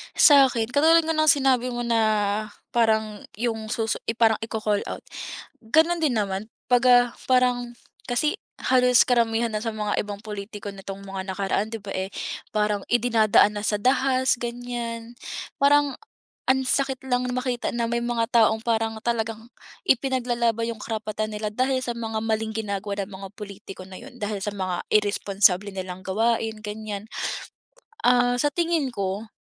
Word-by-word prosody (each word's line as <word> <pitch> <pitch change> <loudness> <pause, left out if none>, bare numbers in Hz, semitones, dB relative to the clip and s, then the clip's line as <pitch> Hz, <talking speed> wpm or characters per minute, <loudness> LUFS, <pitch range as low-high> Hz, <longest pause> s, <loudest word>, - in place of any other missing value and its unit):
Sa'kin, 265 -6 +6
katulad 320 +6 +5
nga 320 0 -1
ng 310 - +4
sinabi 265 -4 +3
mo 240 - -3
na 235 -1 +1 0.7
parang 220 -3 +1
yung 225 -1 -2
susu 220 0 -1 0.2
parang 225 -1 +3
i-call 215 -2 -1
out, - - -6 0.6
ganun 320 +9 +3
din 300 -5 +2
naman 200 +1 -2 0.2
pag, 245 -1 +4
ah, 245 0 +7 0.2
parang 250 -1 +2 0.3
kasi 295 +9 0 0.2
halos 250 -2 +5
karamihan 235 -1 +2
na 215 - -2
sa 225 0 -3
mga 210 -1 -2
ibang 205 -1 -7
pulitiko 205 -1 -7
nitong 195 0 -8
mga 190 -1 -5
nakaraan 200 +3 -1
di 225 - -5
ba, 200 - -9
eh, 190 +1 -4 0.4
parang 210 -1 0
idinadaan 220 -3 +4
na 205 - -3
sa 205 0 0
dahas 260 +1 +2
ganiyan, 240 -1 -5 0.4
parang 285 0 +3 0.5
ang 265 0 +4
sakit 265 0 0
lang 250 0 +1
na - - -2
makita 250 -1 -2
na 235 -1 -1
may 235 0 0
mga 240 -1 -1
taong 220 -1 +4
parang 225 -1 0
talagang 225 -1 -2 0.4
ipinaglalaban 240 - +1
yung - - -13
karapatan 215 -1 -3
nila 210 0 -3
dahil 255 +2 +1
sa 240 -2 -3
mga 225 -1 -3
maling 220 0 -1
ginagawa 200 -2 -3
ng 195 +1 -7
mga 195 0 -7
pulitiko 200 -2 -9
na 185 - -9
yun, 260 +2 -12
dahil 205 0 -2
sa 205 +1 -3
mga 185 -3 -3
irresponsable 200 -1 +2
nilang 185 -1 -6
gawain 220 +2 0
ganiyan. 210 -1 -6 1.0
Ah, 245 0 +4
sa 290 - +3
tingin 335 -3 +1
ko, 200 +2 -3
225 Hz, 155 wpm, -24 LUFS, 210-245 Hz, 1.0 s, ah